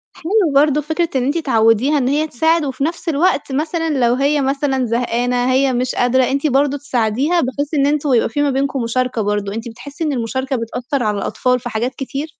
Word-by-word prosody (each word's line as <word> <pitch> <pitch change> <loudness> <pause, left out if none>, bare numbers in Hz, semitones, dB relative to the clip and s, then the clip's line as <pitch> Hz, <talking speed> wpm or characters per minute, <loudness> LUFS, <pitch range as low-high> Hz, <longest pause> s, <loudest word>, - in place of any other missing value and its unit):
حلو 370 -1 +1
برضه 295 +1 +4
فكرة 320 +3 -1
إن 260 - +1
أنتِ 285 +5 0
تعودّيها 245 -1 +2
إن 255 -3 0
هي 295 +3 +1
تساعد، 320 +4 +1
وفي 270 0 -3
نفس 335 +3 -2
الوقت 315 -1 +1
مثلًا 320 +4 -1 0.2
لو 235 - +3
هي 280 +3 +1
مثلًا 270 -1 0
زهقانة 245 +1 0
هي 265 0 +2
مش 250 +1 -1
قادرة، 250 +1 +2
أنتِ 275 +4 0
برضه 280 +1 +1
تساعديها، 270 +5 0
بحيث 285 +4 -3
إن 280 -2 +2
أنتوا 290 -2 +1
يبقى 230 - +2
في 290 +6 -2
ما 290 - +2
بينكم 270 0 -1
مشاركة 250 0 -1
برضه، 205 -1 -2
أنتِ 225 +2 -5
بتحسي 280 +7 -8
إن 305 -2 0
المشاركة 260 +2 -2
بتأثّر 245 +3 -3
على 210 -1 0
الأطفال 250 +5 0
في 240 0 -6
حاجات 240 +3 -2
كتير؟ 275 +2 -5
270 Hz, 205 wpm, -18 LUFS, 245-295 Hz, 0.2 s, برضه